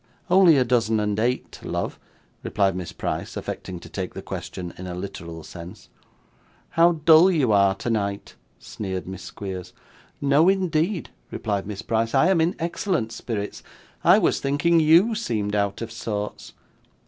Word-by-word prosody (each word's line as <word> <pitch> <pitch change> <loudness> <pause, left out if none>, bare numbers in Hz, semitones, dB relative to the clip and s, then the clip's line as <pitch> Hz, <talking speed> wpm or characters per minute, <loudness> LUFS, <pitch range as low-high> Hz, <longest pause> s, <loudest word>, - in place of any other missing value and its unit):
'Only 180 -5 +7
a 130 - +4
dozen 115 -2 +2
and 105 0 -1
eight, 125 +3 -1
love,' - - -3 0.4
replied 95 -3 +1
Miss 90 -2 -5
Price, - - -4
affecting 90 -2 -5
to - - -11
take - - -5
the - - -6
question 90 -2 -6
in 90 - -8
a 90 - -5
literal 85 -3 -7
sense. 90 +6 -11 0.8
'How 170 +1 +4
dull 160 +3 +6
you 145 -10 +2
are 100 -1 +4
tonight!' 100 -2 -2 0.2
sneered 95 -3 -6
Miss 95 0 -7
Squeers. 95 -3 -7 0.5
'No, 145 +5 +4
indeed,' 185 -1 0 0.2
replied 100 -3 -3
Miss 100 -2 -6
Price, 115 +2 0
'I 160 +7 +5
am 185 -4 +3
in 170 +3 +1
excellent 170 - -1
spirits. 105 -4 -5 0.4
I - - +7
was - - +2
thinking 145 +5 +2
YOU 165 +8 +5
seemed 110 - -2
out 100 +1 -1
of 115 - -7
sorts. 105 -2 -5
115 Hz, 155 wpm, -24 LUFS, 100-160 Hz, 0.8 s, Only